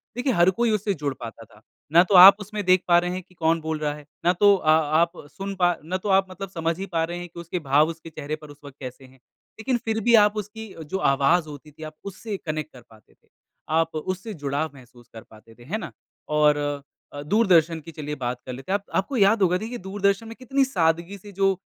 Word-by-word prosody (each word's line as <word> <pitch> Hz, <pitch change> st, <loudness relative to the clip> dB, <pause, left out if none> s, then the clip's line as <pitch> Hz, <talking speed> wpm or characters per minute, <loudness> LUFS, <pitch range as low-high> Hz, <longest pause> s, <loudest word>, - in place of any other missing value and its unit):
देखिए 250 Hz, 0 st, 0 dB
हर 175 Hz, 0 st, +4 dB
कोई 235 Hz, +3 st, 0 dB
उससे 210 Hz, -1 st, 0 dB
जुड़ 145 Hz, -4 st, -3 dB
पाता 115 Hz, -1 st, -9 dB
था। 105 Hz, 0 st, -21 dB, 0.3 s
ना 170 Hz, +2 st, +7 dB
तो 195 Hz, -, +3 dB
आप 190 Hz, +2 st, +11 dB
उसमें 205 Hz, 0 st, -5 dB
देख 185 Hz, 0 st, +4 dB
पा 175 Hz, 0 st, +6 dB
रहे 175 Hz, 0 st, -2 dB
हैं 185 Hz, +1 st, -4 dB
कि 180 Hz, -, -25 dB
कौन 165 Hz, -1 st, +1 dB
बोल 160 Hz, -1 st, -3 dB
रहा 150 Hz, -1 st, -1 dB
है। 150 Hz, -1 st, -12 dB, 0.2 s
ना 175 Hz, -, +4 dB
तो 205 Hz, 0 st, +5 dB
अ 155 Hz, -4 st, -2 dB
आप 160 Hz, +2 st, +3 dB, 0.2 s
सुन 195 Hz, 0 st, -6 dB
पा 175 Hz, -2 st, +2 dB
ना 185 Hz, +4 st, -2 dB
तो 200 Hz, +2 st, -5 dB
आप 190 Hz, 0 st, +3 dB
मतलब 195 Hz, +1 st, -7 dB
समझ 165 Hz, -2 st, -2 dB
ही 195 Hz, -, -3 dB
पा 165 Hz, -4 st, -1 dB
रहे 175 Hz, +1 st, -4 dB
हैं 175 Hz, -, -7 dB
कि 170 Hz, -, -11 dB
उसके 170 Hz, +1 st, -4 dB
भाव 150 Hz, +1 st, +3 dB
उसके 165 Hz, 0 st, -9 dB
चेहरे 155 Hz, -1 st, -5 dB
पर 150 Hz, -1 st, -14 dB
उस 145 Hz, -, -13 dB
वक़्त 140 Hz, -1 st, -11 dB
कैसे 130 Hz, 0 st, -9 dB
हैं। 130 Hz, 0 st, -20 dB, 0.4 s
लेकिन 245 Hz, +2 st, 0 dB
फ़िर 220 Hz, -1 st, -2 dB
भी 235 Hz, -1 st, +5 dB
आप 210 Hz, 0 st, +5 dB
उसकी 210 Hz, 0 st, -7 dB
जो 190 Hz, +6 st, -4 dB
आवाज़ 155 Hz, +5 st, +2 dB
होती 150 Hz, +1 st, -11 dB
थी, 155 Hz, +2 st, -12 dB
आप 155 Hz, 0 st, -7 dB
उससे 200 Hz, +1 st, -6 dB
कनेक्ट 155 Hz, 0 st, -4 dB
कर 125 Hz, -, -13 dB
पाते 110 Hz, -1 st, -21 dB
थे। -, -, -38 dB, 0.4 s
आप 160 Hz, 0 st, +1 dB
उससे 185 Hz, +7 st, -4 dB
जुड़ाव 145 Hz, 0 st, -3 dB
महसूस 120 Hz, -2 st, -17 dB
कर 110 Hz, -, -10 dB
पाते 110 Hz, +1 st, -18 dB
थे। 120 Hz, -, -17 dB
है 175 Hz, -, -3 dB
ना? -, -, -7 dB, 0.4 s
और 150 Hz, -1 st, +3 dB, 0.6 s
अ, 145 Hz, -, -6 dB
दूरदर्शन 170 Hz, -2 st, +3 dB
की 165 Hz, -, -11 dB
चलिए 150 Hz, -2 st, -6 dB
बात 125 Hz, -2 st, -4 dB
कर 130 Hz, -, -6 dB
लेते 135 Hz, +9 st, -7 dB
हैं। -, -, +3 dB
आप 200 Hz, -, -29 dB
आपको 245 Hz, +7 st, 0 dB
याद 205 Hz, +1 st, +4 dB
होगा 180 Hz, -1 st, +3 dB
देखिए 230 Hz, +5 st, -6 dB
दूरदर्शन 200 Hz, +2 st, -1 dB
में 225 Hz, -, -9 dB
कितनी 270 Hz, +2 st, 0 dB
सादगी 170 Hz, -3 st, 0 dB
से 205 Hz, +2 st, -13 dB
जो 195 Hz, 0 st, +2 dB
170 Hz, 245 wpm, -24 LUFS, 150-195 Hz, 0.6 s, आप